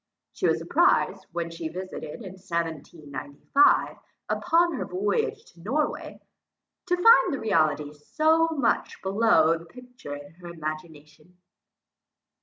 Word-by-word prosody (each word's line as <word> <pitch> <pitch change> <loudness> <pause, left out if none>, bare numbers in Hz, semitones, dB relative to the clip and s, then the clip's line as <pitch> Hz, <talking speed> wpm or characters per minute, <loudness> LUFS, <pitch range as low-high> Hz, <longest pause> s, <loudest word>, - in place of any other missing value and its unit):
She - - 0
was - - +2
surprized, - - +1
when 170 -1 -4
she 165 -1 -5
visited 185 +3 -7
it 155 +9 -8
in 190 - -8
1795, 165 - 0 0.3
upon 340 +1 +2
her 275 - -3
voyage 200 +3 -1
to 170 - -21
Norway, 290 - -2 0.7
to 360 - +2
find 455 +7 +6
the 275 - -2
reality 155 -7 +1
so 315 - +2
very 320 -4 -3
much 230 - 0
below 190 -5 +3
the 165 - -13
picture 250 - -10
in 145 0 -11
her 175 - -9
imagination. 155 0 -8
175 Hz, 130 wpm, -26 LUFS, 155-250 Hz, 0.7 s, find